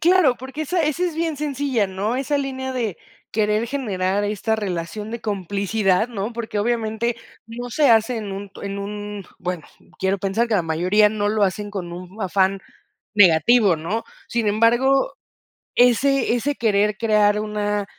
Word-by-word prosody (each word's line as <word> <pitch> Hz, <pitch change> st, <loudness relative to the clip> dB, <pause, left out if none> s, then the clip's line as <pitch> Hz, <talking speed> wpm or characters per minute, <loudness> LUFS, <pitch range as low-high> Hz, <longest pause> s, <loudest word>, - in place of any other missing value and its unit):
Claro, 340 Hz, -7 st, +4 dB
porque 265 Hz, +4 st, -6 dB
esa 345 Hz, +3 st, 0 dB
esa 310 Hz, +3 st, 0 dB
es 350 Hz, -3 st, -2 dB
bien 325 Hz, -2 st, -1 dB
sencilla, 275 Hz, -7 st, 0 dB
¿no? 200 Hz, +5 st, -2 dB
Esa 275 Hz, +2 st, 0 dB
línea 265 Hz, -1 st, -3 dB
de 225 Hz, -8 st, -2 dB, 0.3 s
querer 215 Hz, +1 st, +1 dB
generar 205 Hz, -7 st, -1 dB
esta 215 Hz, +2 st, -1 dB
relación 205 Hz, +1 st, -4 dB
de 235 Hz, -, -5 dB
complicidad, 200 Hz, +1 st, 0 dB
¿no? 220 Hz, -1 st, -4 dB
Porque, 225 Hz, -2 st, -4 dB
obviamente, 230 Hz, +1 st, 0 dB, 0.3 s
no 240 Hz, +2 st, -6 dB
se 285 Hz, +3 st, +3 dB
hace 225 Hz, +2 st, +4 dB
en 210 Hz, -3 st, -5 dB
un 200 Hz, +1 st, -6 dB
en 200 Hz, 0 st, -4 dB
un, 205 Hz, 0 st, -6 dB
bueno, 180 Hz, -3 st, -4 dB, 0.3 s
quiero 190 Hz, +1 st, 0 dB
pensar 200 Hz, +5 st, 0 dB
que 225 Hz, -, +1 dB
la 185 Hz, -, +2 dB
mayoría 180 Hz, +6 st, +3 dB
no 205 Hz, -1 st, -1 dB
lo 215 Hz, 0 st, +1 dB
hacen 205 Hz, +1 st, 0 dB
con 180 Hz, -4 st, -5 dB
un 180 Hz, +4 st, -9 dB
afán 190 Hz, +1 st, +1 dB, 0.5 s
negativo, 200 Hz, +1 st, +5 dB
¿no? 180 Hz, +9 st, -3 dB, 0.2 s
Sin 235 Hz, -2 st, -1 dB
embargo, 240 Hz, +6 st, +3 dB, 0.6 s
ese 250 Hz, +1 st, +4 dB
ese 285 Hz, +4 st, -1 dB
querer 210 Hz, -2 st, +1 dB
crear, 210 Hz, -2 st, +3 dB
una, 210 Hz, -1 st, -1 dB
215 Hz, 160 wpm, -22 LUFS, 200-245 Hz, 0.6 s, negativo